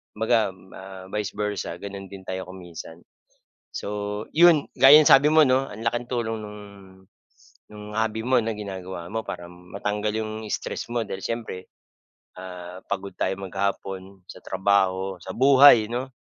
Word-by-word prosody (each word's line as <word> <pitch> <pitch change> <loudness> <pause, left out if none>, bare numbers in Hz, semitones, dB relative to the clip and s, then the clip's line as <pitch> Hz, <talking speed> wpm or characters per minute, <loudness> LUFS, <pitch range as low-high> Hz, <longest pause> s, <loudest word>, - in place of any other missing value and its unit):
Kumbaga 110 -3 +1
ma 95 0 -12
vice 105 -1 -3
versa, 105 -4 -3
gano'n 100 +1 -8
din 95 0 -11
tayo 95 -1 -5
kung 95 0 -10
minsan. 85 0 -10 0.7
So - - -6 0.5
'yon, 165 -3 +6
gaya 145 +3 +9
ng 150 - +4
sabi 145 +3 +7
mo, 155 -2 +6
'no, 130 0 +1
ang 105 - -9
laking 120 +2 -2
tulong 115 -3 -2
nung 105 0 -9 1.1
nung 105 0 -10
hobby 110 0 -1
mo 125 -1 +3
na 110 -1 -3
ginagawa 95 -4 -7
mo 110 +5 -3
para 85 - -7
matanggal 105 +4 -4
'yong 110 -1 -3 0.2
stress - - -4
mo, 120 -1 -1
dahil 95 - -6
siyempre, 110 -6 -5 0.7
ah, 90 -1 -9
pagod 100 0 -4
tayo 95 - 0
maghapon 95 0 -4
sa 90 - -12
trabaho, 95 -1 0
sa 95 +2 -8
buhay, 130 -4 +7
'no. 125 +2 -2
105 Hz, 155 wpm, -24 LUFS, 95-115 Hz, 1.1 s, gaya